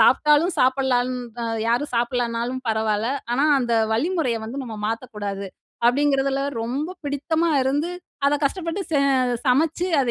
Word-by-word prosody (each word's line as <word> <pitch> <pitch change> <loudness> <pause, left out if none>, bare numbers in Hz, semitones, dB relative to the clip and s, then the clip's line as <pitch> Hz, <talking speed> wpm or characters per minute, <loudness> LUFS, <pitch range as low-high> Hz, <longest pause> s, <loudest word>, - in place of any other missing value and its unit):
சாப்ட்டாலும் 300 +8 +4
சாப்பிடலான் 255 -1 +2 0.3
அ - - -2 0.2
யாரும் 245 +3 0
சாப்பிடலனாலும் 240 +1 -1
பரவாயில்ல 220 +3 0 0.2
ஆனா, 275 +5 +2
அந்த 235 -1 -1 0.2
வழிமுறைய 290 -2 0
வந்து 265 +4 -5
நம்ம 225 -3 -7
மாத்தக்கூடாது" 210 -4 -4 0.4
அப்படிங்கிறதில 275 +1 +2 0.2
ரொம்ப 275 +9 -3
பிடித்தமா 315 +4 0
இருந்து, 290 +6 0 0.4
அத 290 - +3
கஷ்டப்பட்டு 335 +5 -1
சே 295 - +2 0.5
சமைச்சு 315 +7 +2
அத 250 -3 +1
260 Hz, 125 wpm, -23 LUFS, 235-295 Hz, 0.5 s, சாப்ட்டாலும்